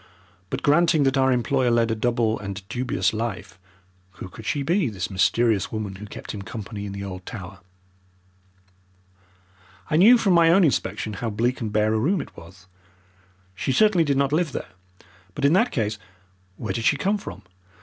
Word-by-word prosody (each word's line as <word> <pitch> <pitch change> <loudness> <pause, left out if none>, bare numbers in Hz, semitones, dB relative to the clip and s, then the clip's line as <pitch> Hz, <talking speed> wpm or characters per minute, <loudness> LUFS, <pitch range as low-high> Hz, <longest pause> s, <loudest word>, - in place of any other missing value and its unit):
But - - -4
granting 155 0 +4
that 135 0 +2
our 130 -1 +3
employer 125 +1 +1
led 115 -1 +2
a - - 0
double 115 -1 0
and 100 -1 -7
dubious 125 +2 -1
life, 110 -4 -5 0.5
who 95 - -9
could 105 +4 -11
she 145 -2 -1
be, 170 -1 +1
this 95 -3 -5
mysterious 100 +2 +1
woman 105 -3 -4
who 105 +2 -9
kept - - -8
him 105 - -6
company 105 0 -7
in - - -6
the 100 0 -6
old 95 -2 -7
tower? 100 -3 -8 2.3
I 155 - +3
knew 225 +8 +7
from 200 -5 +2
my 170 -1 +5
own 185 +3 +5
inspection 125 -7 0
how 115 +3 -3
bleak 120 +5 -1
and 110 -2 -3
bare 110 +1 +2
a 110 - +1
room 175 - +1
it - - -8
was. 90 +2 -14 0.9
She 105 +7 -2
certainly 210 +1 +4
did 140 -3 0
not 140 +1 +1
live 160 -2 0
there. - - -5 0.7
But 140 - -1
in 145 - +4
that 230 +6 +3
case 105 -4 -2 0.6
where 105 -5 -4
did 115 +2 -3
she 145 - +3
come 200 +7 0
from? - - -9
115 Hz, 185 wpm, -24 LUFS, 105-145 Hz, 2.3 s, knew